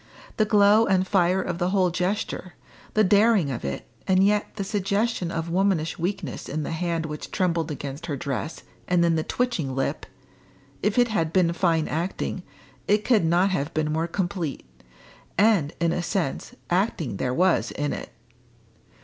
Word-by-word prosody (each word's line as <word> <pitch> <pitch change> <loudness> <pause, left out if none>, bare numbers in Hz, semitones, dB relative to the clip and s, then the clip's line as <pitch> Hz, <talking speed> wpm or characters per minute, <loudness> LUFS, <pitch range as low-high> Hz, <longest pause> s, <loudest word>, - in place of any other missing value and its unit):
The 215 - +3
glow 210 +1 +5
and 190 -1 +2
fire 185 -1 +2
of 175 -1 -4
the 175 0 +1
whole 185 -2 +2
gesture 180 0 -2 0.4
the 215 - +5
daring 205 -5 +4
of 120 - -5
it, 70 0 -4 0.2
and 190 0 +4
yet 210 +1 +1
the 205 - -3
suggestion 200 0 -1
of 165 -1 -3
womanish 180 -4 +1
weakness 170 -6 -3
in 155 +2 -2
the - - -4
hand 165 0 -1
which 150 -1 -6
trembled 170 -3 0
against 145 +2 -6
her 145 -4 -2
dress 140 +3 -4 0.2
and 175 -1 +3
in 170 - +3
the 160 - +1
twitching 170 - -1
lip 135 - -2 0.7
if 210 +3 0
it 245 -1 +4
had 165 -7 0
been 170 -2 +3
fine 165 -3 +1
acting, 175 +3 -3 0.5
it 210 +1 +2
could 225 -7 +4
not 175 +4 +3
have 165 -3 -2
been 155 -1 0
more 160 +2 0
complete. 175 -4 -3 0.7
And, 200 -7 +4
in 170 0 +2
a 175 - -1
sense, 185 - -2 0.2
acting 175 - 0
there 125 - -1
was 180 +7 +2
in 145 0 -2
it. - - -6
175 Hz, 170 wpm, -25 LUFS, 160-200 Hz, 0.7 s, glow